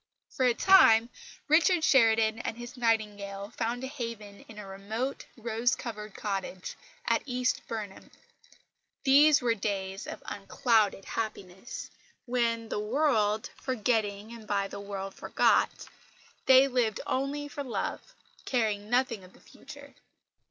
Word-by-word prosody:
For 255 - +1
a 240 - +2
time 240 -12 +6 0.4
Richard 325 +2 +4
Sheridan 225 -5 +4
and 230 - -4
his 240 +1 -9
Nightingale 210 -4 -1
found 240 +2 -2
a - - -2
haven 230 -7 -7
in 220 - -13
a 210 - -7
remote, 215 +7 -4
rose 235 +2 0
covered 215 -3 -7
cottage 195 -2 -4 0.3
at - - +2
East 250 -1 0
Burnham. 210 -4 -6 0.9
These 285 0 +6
were 235 -1 +3
days 195 -2 -3
of - - -8
unclouded 205 0 +1
happiness, 215 -1 -6 0.3
when, 230 -2 0
the - - -2
"world 215 -3 +1
forgetting 220 -3 -1
and 225 -2 -11
by 200 -1 0
the - - -8
world 195 -1 -6
forgot," - - +1 0.6
they 265 +1 +7
lived 245 -5 0
only 280 +2 -2
for 285 0 -6
love, 245 - -4 0.3
caring 215 -4 -1
nothing 245 -4 +1
of 185 - -16
the - - -20
future. 285 -1 -13
225 Hz, 130 wpm, -29 LUFS, 205-255 Hz, 0.9 s, they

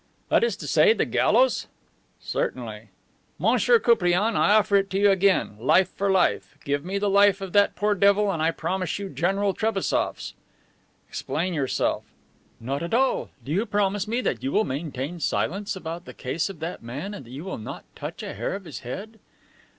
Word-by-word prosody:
"That - - +4
is 470 - +1
to - - -9
say, 450 - +5
to - - -11
the - - +2
gallows?" - - +2 0.5
"Certainly." - - -4 0.5
"Monsieur 485 - +4
Koupriane, 215 - +2
I 205 - +4
offer 205 -1 +4
it 195 0 0
to 190 - -1
you 205 0 +5
again. 190 - +2
Life 180 +10 +4
for 200 0 -2
life. 185 -5 +1
Give 145 0 -1
me 190 +3 -3
the 205 +1 0
life 200 0 +4
of 195 -2 -7
that 205 0 +4
poor 210 0 +1
devil 200 +1 +3
and 160 - -3
I 160 - +3
promise 185 +1 -2
you 200 -1 -5
General 195 +7 0
Trebassof's." 215 -2 -1 0.7
"Explain 180 +4 -3
yourself." 140 -5 -1 0.5
"Not 135 +5 -3
at 170 +6 -1
all. 265 +2 +1 0.2
Do 140 - -5
you 195 +7 +2
promise 205 0 0
me 235 +3 0
that - - -2
you 270 - -2
will 215 - +3
maintain 145 +3 -4
silence 195 +7 -1
about 170 -1 -6
the - - -11
case 155 +7 -2
of 185 -5 -10
that 165 +2 -5
man 145 - -6
and 140 - -8
that 120 - -15
you 135 +5 -7
will 190 -8 -5
not 110 - -8
touch - - -7
a - - -5
hair 115 - -3
of 195 -1 -8
his 160 - -7
head?" 205 - -7
190 Hz, 195 wpm, -25 LUFS, 160-205 Hz, 0.7 s, say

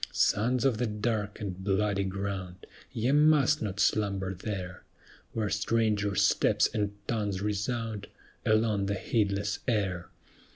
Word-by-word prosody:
Sons 120 +4 +2
of 125 -5 +2
the 125 - +1
Dark 105 -1 -2
and 95 -3 -5
Bloody 100 0 +1
ground, 95 -1 -4 0.3
Ye 120 +3 0
must 150 0 +4
not 105 -2 -3
slumber 100 -2 +1
there, 90 -1 -5 0.5
Where 105 -4 -1
stranger 105 -1 +1
steps - - +3
and 105 -1 -1
tongues 105 -5 -1
resound 105 0 -2 0.4
Along 110 -2 +2
the 100 - 0
heedless 100 0 0
air. 95 -7 -1
105 Hz, 125 wpm, -29 LUFS, 100-110 Hz, 0.5 s, must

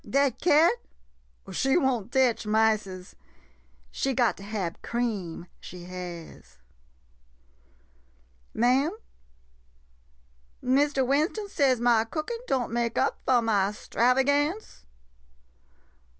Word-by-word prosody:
Dat 275 -1 +1
cat? 320 -3 +5 0.8
She 270 +4 +1
won't 245 - 0
tech 260 -3 +2
miceses 215 -4 0 0.4
— - - -37 0.3
she 270 -1 -1
got 240 -3 +2
to - - -12
hab 200 -5 -4
cream 210 -9 -3
— - - -37
she 180 0 -10
has! 175 - -9 1.9
Ma'am? 270 - +2 1.6
Mistah 275 +1 +2
Winston 310 - 0
says 270 -8 +2
ma 235 -2 +3
cookin' 310 - -4
don' 250 -4 -1
make 235 -1 -1
up 270 - +1
fo' 250 -2 +4
ma 200 -3 +2
'stravagance? 265 - 0
245 Hz, 100 wpm, -27 LUFS, 210-275 Hz, 1.9 s, cat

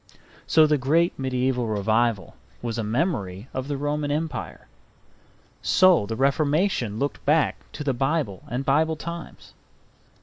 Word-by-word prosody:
So 160 -1 +6
the 150 -1 +2
great 165 +7 +2
mediaeval 130 -2 0
revival 110 0 0 0.3
was 120 -1 -3
a - - -1
memory 105 - -2
of 130 0 -4
the 145 -1 -2
Roman 145 +1 -2
Empire. 155 +2 -4 0.9
So 185 - +4
the 115 - -3
Reformation 140 - +1
looked 140 +4 -3
back 150 +1 +2 0.2
to 150 - -5
the 140 -2 0
Bible 135 - -1
and 125 +3 -3
Bible 160 +3 +2
times. 170 +2 -8
135 Hz, 135 wpm, -24 LUFS, 115-155 Hz, 0.9 s, So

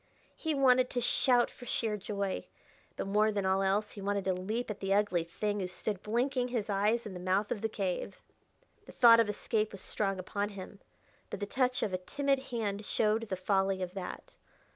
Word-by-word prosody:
He 320 -2 -2
wanted 255 -2 +4
to 245 - -1
shout 245 0 +3
for 245 - -12
sheer 220 -3 0
joy; 200 -1 -3 0.5
but - - -3
more 210 +2 +3
than 200 -2 -1
all 190 +1 +2
else 200 +2 +1
he 200 - -9
wanted 200 -1 -1
to 190 - +2
leap 215 +6 -3
at 205 - -7
the 195 0 +1
ugly 200 -5 +2
thing 205 +5 -2
who 185 - -2
stood 190 +2 -4
blinking 245 +3 0
his 230 -4 -2
eyes 210 +4 +1
in 210 - -6
the 180 - -6
mouth 185 +3 0
of 210 - -2
the 220 - 0
cave. 195 -1 -3 0.7
The - - -11
thought 230 -2 +8
of 225 -2 +3
escape 215 +1 -1
was 195 - -8
strong 195 -2 -1
upon 200 +3 -2
him, 195 0 -9 0.5
but - - -5
the 205 - -2
touch 255 +3 0
of 195 - -1
a 185 - 0
timid 275 +8 0
hand 215 -4 -2
showed 215 +1 +1
the 190 - -1
folly 190 0 +1
of 180 0 -5
that. 190 -2 -7
205 Hz, 205 wpm, -31 LUFS, 195-230 Hz, 0.7 s, thought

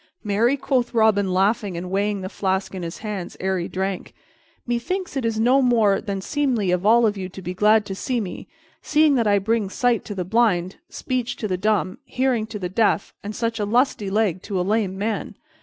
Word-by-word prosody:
"Marry," 225 +6 +2
quoth 255 -3 -1
Robin, 210 -4 +3
laughing, 195 0 +1
and 180 +1 -6
weighing 200 +1 0
the 185 - -4
flask 190 0 -2
in 185 - -5
his 170 0 -5
hands 200 -4 -5
ere 190 0 0
he 170 - -3
drank, 190 0 -4 0.5
"methinks 315 +10 -2
it 265 -3 -1
is 225 -1 0
no 250 +4 +4
more 225 -6 +3
than 200 -3 -4
seemly 245 -6 0
of 180 -1 +1
you 200 - -1
all 230 0 +5
to 190 -1 -7
be 180 +2 -4
glad 210 +2 +4
to 195 - -5
see 245 +5 -2
me, 185 -5 -6 0.3
seeing 305 0 +3
that 235 -5 +2
I 205 -1 +4
bring 210 0 0
sight 245 +1 +1
to 205 - -6
the 180 -2 -3
blind, 190 -4 +1
speech 250 -2 -3
to 215 - -4
the 185 - -1
dumb, 200 +2 0
hearing 255 -5 0
to 220 -1 -6
the 185 -3 -3
deaf, 205 +2 +1
and 205 +1 -5
such 230 -1 -2
a - - 0
lusty 220 -1 +1
leg 195 -3 +1
to 195 -3 -3
a - - +1
lame 200 -2 0
man. 215 +3 -3
210 Hz, 210 wpm, -23 LUFS, 190-235 Hz, 0.5 s, all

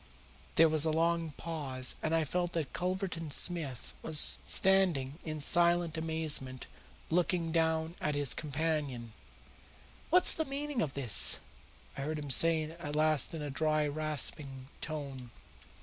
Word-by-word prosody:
There 165 - +7
was 155 -1 0
a 160 - +1
long 165 +1 0
pause, 140 -6 -3
and 160 +1 0
I 165 - +2
felt 175 +3 -2
that 160 -5 -3
Culverton 180 -3 -3
Smith 145 -5 -1
was 155 -2 0
standing 175 -7 +3
in 155 -1 -5
silent 170 +1 +3
amazement 160 -5 -1 0.5
looking 170 -1 0
down 160 0 0
at 150 -1 -1
his 145 -3 +3
companion. 145 -6 -3 1.0
"What's 360 +1 +4
the 320 - -2
meaning 280 -2 -3
of 145 -9 -2
this?" 120 -10 +4 0.6
I - - -6
heard 155 +3 -3
him 145 -2 -5
say 165 +3 +6
at 155 -1 -7
last 155 +1 +2
in 155 - -5
a 145 - -5
dry, 155 +1 0
rasping 145 -3 -2
tone. 140 -5 -6
155 Hz, 140 wpm, -31 LUFS, 145-165 Hz, 1.0 s, There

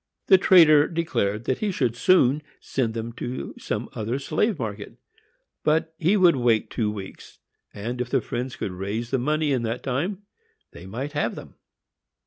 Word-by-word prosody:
The 190 -2 +6
trader 155 -6 +6
declared 115 - -1
he 200 +10 -1
should 125 -9 0
soon 145 0 +4 0.2
send 120 -4 -2
them 115 0 -4
to 125 +2 -5
some - - -3
other 115 +4 -2
slave 160 - 0
market, 105 -5 -6 0.7
but 160 +1 +1
he 180 +6 +3
would 180 -4 +5
wait 120 -4 +1
two 110 -4 0
weeks, 100 -2 -9 0.3
and, 120 +5 -4
if 125 - -3
the - - +2
friends 125 +1 -4
could 95 - -4
raise 100 +6 -4
the 135 - +1
money 150 +3 0
in 130 -3 +1
that 115 +1 -3
time, 175 +10 -2 0.5
they - - -11
might 130 +9 -5
have 145 0 -1
them. - - -10
130 Hz, 165 wpm, -24 LUFS, 115-155 Hz, 0.7 s, The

